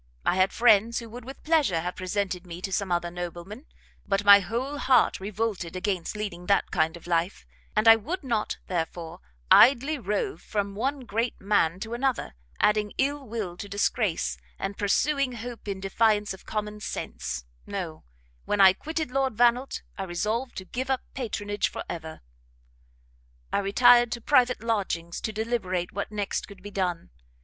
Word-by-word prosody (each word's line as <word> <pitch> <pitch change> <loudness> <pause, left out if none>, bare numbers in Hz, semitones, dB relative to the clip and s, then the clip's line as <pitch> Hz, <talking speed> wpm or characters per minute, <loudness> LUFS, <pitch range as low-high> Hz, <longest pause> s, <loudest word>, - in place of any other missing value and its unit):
I - - +3
had 185 +1 +3
friends 230 -1 +4
who 230 -2 -6
would 245 +1 -9
with 270 +2 -10
pleasure 300 - +2
have 180 +2 -4
presented 185 -1 -2
me 170 0 -7
to 195 - -3
some 195 -1 -1
other 175 0 0
nobleman; 175 - -7 0.4
but 195 0 0
my 200 0 +10
whole 255 +8 -3
heart 265 -2 +3
revolted 195 -3 -3
against 185 0 -2
leading 190 -4 -5
that 200 -1 +2
kind 160 +2 +1
of 170 - -16
life, 175 +2 -1 0.3
and 215 +2 +2
I 225 0 +10
would 320 - -5
not, 230 -5 -1
therefore, 165 -2 -4 0.3
idly 275 +4 +6
rove 220 - -2
from 200 -2 -2
one 265 +7 -2
great 230 0 -2
man 190 -4 +2
to 220 +2 -5
another, 260 - -1 0.3
adding 210 0 +2
ill 280 0 0
will 210 -6 -4
to 205 - -7
disgrace, 200 -2 0 0.2
and 195 +1 -4
pursuing 275 +6 +1
hope 235 -1 -8
in 195 -1 -3
defiance 210 +1 +1
of 190 - -14
common 210 0 -3
sense; 65 - -5 0.2
no; 180 -6 -5 0.4
when 205 - 0
I 190 -1 +8
quitted 315 - -4
Lord 270 -3 0
Vannelt, 245 +2 +2 0.2
I - - -1
resolved 215 +8 -2
to 190 - -5
give 260 +6 -4
up 265 -1 +1
patronage 205 -5 -2
for - - -6
ever. 160 -2 -7 1.3
"I - - +3
retired 240 +4 +5
to 235 - -4
private 250 -3 +3
lodgings 190 -7 -2
to 220 - -2
deliberate 210 -5 -2
what 200 +1 -4
next 205 -1 -2
could 195 -2 -14
be 205 - -8
done. 180 -4 -2
210 Hz, 170 wpm, -27 LUFS, 185-240 Hz, 1.3 s, my